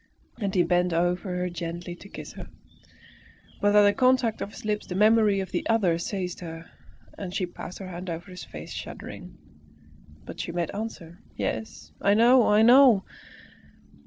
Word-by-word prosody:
And 200 -3 -2
he 180 - +4
bent 175 0 +1
over 175 +3 0
her 180 0 -1
gently 175 0 -5
to 200 - -13
kiss - - -9
her. - - -9 1.1
But 205 0 +3
at 210 - +7
the 205 0 +5
contact 255 -3 +2
of - - -3
his 210 - -12
lips 210 0 -2
the 180 - -5
memory 210 -1 +4
of 190 - -6
the - - -1
other 190 -7 +2
seized 180 0 -4
her, 165 -2 -8 0.5
and 190 -3 -5
she 185 - 0
passed 175 +1 -9
her 190 - -8
hand 180 +1 -7
over 170 +3 -6
her - - -10
face - - -9
shuddering. - - -8 0.9
But - - -9
she - - -3
made 170 -1 -2
answer, 200 -5 -7 0.2
"Yes, 75 -9 -4
I 200 +1 +4
know, 240 +2 +6
I 210 +1 +5
know!" 245 -4 +7
190 Hz, 175 wpm, -26 LUFS, 175-210 Hz, 1.1 s, at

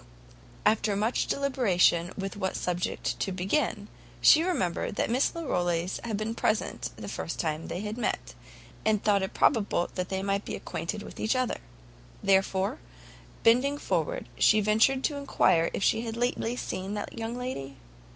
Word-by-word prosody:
After 210 -1 +3
much 215 +4 0
deliberation 190 -11 +2
with 195 -1 -4
what 190 -2 -2
subject 175 0 -2
to 195 - -1
begin, 205 +3 -1 0.3
she 310 - +7
remembered 245 - -1
that 225 - 0
Miss 255 +3 +2
Larolles 175 - -1
had 225 -3 -2
been 215 +2 -2
present 220 -1 -1
the - - -8
first - - -4
time 155 -1 -2
they 180 - -4
had 210 +3 -4
met, - - -2 0.5
and 215 -2 +2
thought 205 -2 +3
it 190 - -4
probable 205 -8 +2
they 190 +1 -2
might 200 +1 0
be - - -4
acquainted 205 +5 -4
with - - -10
each 220 +4 +1
other; 255 -1 +1
and - - -8 0.7
therefore, 190 0 +2 0.6
bending 255 +5 +4
forward, - - -1
she 215 - +6
ventured 220 +6 +3
to 290 - 0
enquire 185 -11 +3
if - - -3
she 225 - +3
had 230 -1 -5
lately 245 -1 0
seen 195 -4 -4
that 205 - -5
young 225 +1 -4
lady? 140 - -5
210 Hz, 160 wpm, -28 LUFS, 190-240 Hz, 0.7 s, she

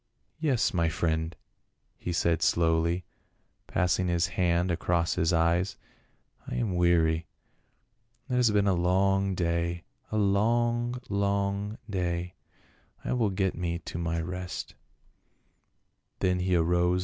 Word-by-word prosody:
" - - -44
Yes, 125 -4 +2
my 85 -2 +2
friend," 80 0 -1 0.6
he 90 - -4
said 85 -1 +1
slowly, 85 +1 +2 0.6
passing 90 0 +1
his 85 -1 +1
hand 90 0 +1
across 85 -1 +1
his 80 +1 +1
eyes. 85 +3 +1 0.3
" - - -35
I - - -4
am 110 -6 -1
weary. 85 -2 +2 1.0
It 130 - -4
has 125 -2 +4
been 105 -1 +2
a 100 - +3
long 95 +2 +2
day 85 0 -1
— - - -36
a 110 - 0
long, 120 +4 +1
long 100 +1 -1
day; 90 -3 -2 0.7
I - - 0
will 115 -4 +2
get 95 0 0
me 85 -1 -2
to 85 0 -7
my 85 -1 -1
rest." 90 +1 -5
90 Hz, 125 wpm, -28 LUFS, 85-100 Hz, 1.0 s, has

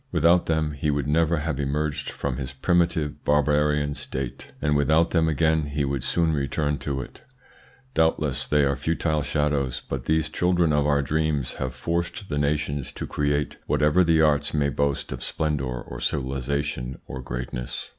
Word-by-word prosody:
Without 85 +2 +4
them 80 -2 +1
he 75 +1 -2
would 70 -2 0
never 80 +3 +2
have 75 -2 -2
emerged 75 +1 -1
from 60 - -3
his 70 -1 -5
primitive 85 0 +1
barbarian 75 0 +2
state, 65 -3 -5
and 75 0 +1
without 80 +4 +3
them 80 -2 +3
again 80 0 +2
he 75 0 -1
would 70 -1 -2
soon 80 +4 +1
return 75 0 -1
to 70 -2 -2
it. - - -11 0.7
Doubtless 80 -4 +1
they 75 -1 +3
are 70 -1 +1
futile 75 +2 0
shadows; 75 -3 0
but 65 -2 -4
these 80 -1 +2
children 85 0 +2
of 75 0 +2
our 70 -1 +2
dreams 75 -2 0
have 65 0 -3
forced 85 +8 -3
the 75 -1 -1
nations 70 -1 -1
to - - -5
create 75 0 -1
whatever 75 +5 +3
the 80 -1 +4
arts 75 -1 +2
may 70 -1 +2
boast 70 0 -1
of 60 -1 -5
splendour 70 -6 -2
or - - -7
civilisation 70 -1 -2
of 65 +1 -6
greatness. 60 0 -5
75 Hz, 165 wpm, -25 LUFS, 70-80 Hz, 0.7 s, Without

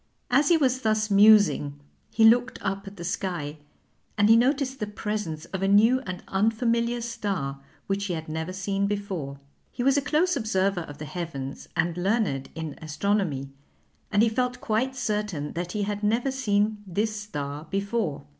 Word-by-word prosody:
As 275 +4 +4
he 340 - +6
was 260 -4 +1
thus 215 -1 +1
musing 200 -8 +5 0.3
he 225 - +3
looked 245 +2 +5
up 195 0 -3
at 200 +1 -9
the 170 - -7
sky, 170 -4 -3 0.6
and 205 +1 +4
he 225 - +8
noticed 265 +2 +2
the 210 - -2
presence 210 -7 -4
of 190 - -2
a 195 - +2
new 220 +6 +5
and 185 0 -5
unfamiliar 230 +3 +1
star, 200 -12 -3 0.2
which 200 0 -1
he 185 - -2
had 160 0 -6
never 160 +3 -3
seen 195 +1 -1
before. 190 -9 -4 0.3
He 245 - -3
was 275 +2 +4
a - - +3
close 320 +5 +2
observer 195 -6 0
of 145 -3 -9
the 155 - -6
heavens 150 -4 -6
and 170 -1 +1
learned 190 - 0
in 160 -2 -6
astronomy, 155 -4 -1 0.6
and 205 +1 +4
he 230 - +4
felt 250 +2 -1
quite 250 +4 0
certain 210 - -2
that 175 +1 -4
he 210 -1 -1
had 205 0 -3
never 230 +6 +1
seen 210 -4 0
this 215 +4 -1
star 150 -8 -5
before. 195 -7 -2
205 Hz, 175 wpm, -26 LUFS, 170-230 Hz, 0.6 s, he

